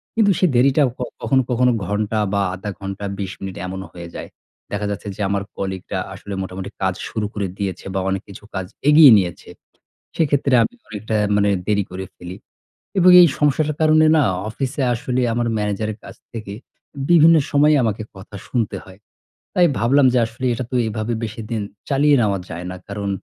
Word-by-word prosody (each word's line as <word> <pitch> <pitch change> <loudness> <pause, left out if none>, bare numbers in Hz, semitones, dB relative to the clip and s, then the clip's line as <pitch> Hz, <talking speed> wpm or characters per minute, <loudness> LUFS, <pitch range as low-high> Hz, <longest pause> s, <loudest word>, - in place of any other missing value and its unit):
কিন্তু 210 -3 +4
সেই 185 - +3
দেরিটাও 135 +2 +4
ক - - -42 0.2
কখনো, 135 -1 +2
কখনো 125 +1 +3
ঘন্টা 105 +3 -1
বা 100 - +2
০.৫ 95 +3 -6
ঘন্টা 100 +1 -6
২০ 95 -2 -3
মিনিট 95 -1 -6
এমনও 95 -1 -6
হয়ে 85 -1 -9
যায়। - - -7 0.4
দেখা 105 0 -2
যাচ্ছে 100 - -6
যে - - -7
আমার 100 0 -1
কলিগরা 95 -1 -4
আসলে 100 +1 -8
মোটামুটি 95 +1 -6
কাজ 95 -1 +1 0.2
শুরু 110 -2 -2
করে 100 -2 -2
দিয়েছে 95 -3 -4
বা - - +1
অনেক 95 0 -1
কিছু 100 - -11
কাজ 95 -1 -2 0.2
এগিয়ে 150 -3 +9
নিয়েছে। 90 -3 -5 0.7
সেক্ষেত্রে 140 -4 +2
আমি 240 - -3 0.2
অনেকটা 110 +1 -4 0.2
মানে 105 0 +3 0.2
দেরি 100 -1 +2
করে 95 +1 -5
ফেলি। 90 +1 -9 0.6
এবং 185 0 +6
এই 175 - +8
সমস্যাটার 150 +1 +1
কারণে 155 0 +5
না 150 - +4 0.3
অফিসে 135 +4 -3
আসলে 125 +2 -2
আমার 120 0 0
ম্যানেজারের 105 +1 -2
কাছ - - -10 0.2
থেকে 110 -3 -6 0.6
বিভিন্ন 165 -1 +7 0.2
সময়ে 150 +1 +4
আমাকে 110 -1 -1
কথা 95 +2 -12
শুনতে 115 -5 -1
হয়। 95 +1 -15 0.6
তাই 180 - +5
ভাবলাম 130 +4 +4
যে - - +4
আসলে 115 +3 -8
এটা 125 - -4
তো 125 - -1
এভাবে 110 +2 -3
বেশিদিন 110 0 -5 0.3
চালিয়ে 145 +1 +4
নেওয়া 100 -2 +1
যায় 85 +1 -6
না। 90 - -6
কারণ 100 0 -4
110 Hz, 180 wpm, -20 LUFS, 100-135 Hz, 0.7 s, এগিয়ে